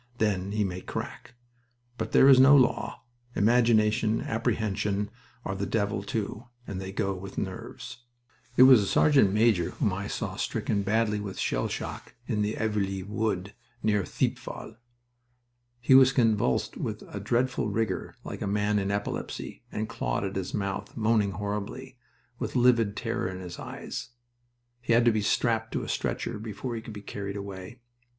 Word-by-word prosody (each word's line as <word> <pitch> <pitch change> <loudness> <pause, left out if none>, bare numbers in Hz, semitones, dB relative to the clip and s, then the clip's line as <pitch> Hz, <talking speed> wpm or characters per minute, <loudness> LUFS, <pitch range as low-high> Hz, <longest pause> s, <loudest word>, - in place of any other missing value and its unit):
Then 100 -3 0
he 105 0 +1
may 90 -2 -3
crack. 115 - -6 0.6
But - - -3
there 135 - +6
is 135 -2 +8
no 140 +2 +8
law. 130 -2 +1 0.3
Imagination 110 -1 +3
apprehension 105 -6 -1 0.3
are 95 - -2
the 100 +1 -3
devil, 100 -2 0
too, 105 +3 -4 0.2
and 95 -4 -5
they 95 0 -5
go 100 0 -1
with 95 +1 -8
'nerves.'" - - -5 0.6
It 130 - +9
was 130 -4 +9
a 100 - -2
sergeant 135 -8 +4
major 105 -5 +3
whom 100 - -1
I 100 +2 -3
saw - - -4
stricken 100 - -1
badly 105 +1 +1
with 100 -2 -6
shell - - 0
shock - - -6
in 110 -5 -1
Aveluy 105 -3 -1
Wood 105 -1 -2 0.3
near 105 -2 +2
Thiepval. 110 - -3 1.0
He 120 +2 +3
was 130 0 +8
convulsed 110 - +1
with - - -4
a 100 - -7
dreadful 120 +2 0
rigor 110 +2 -2
like - - -7
a - - -1
man 105 +1 +1
in 95 0 -1
epilepsy, 100 0 -4
and 110 0 -2
clawed 115 -3 -2
at 95 0 -3
his 95 -2 -3
mouth, 100 0 -3
moaning 110 -3 +2
horribly, 105 +6 -5 0.4
with - - -4
livid 120 -5 +3
terror 115 -1 -2
in 95 - -6
his 90 -2 -8
eyes. - - -6 0.7
He 120 -1 +1
had 120 0 +5
to 120 - +6
be 110 -1 0
strapped 110 +1 +1
to - - -1
a - - -6
stretcher - - -2
before 110 +3 -5
he 115 - -4
could 110 - -9
be 105 -1 -9
carried 100 -1 -5
away. 100 +4 -8
105 Hz, 165 wpm, -28 LUFS, 100-115 Hz, 1.0 s, It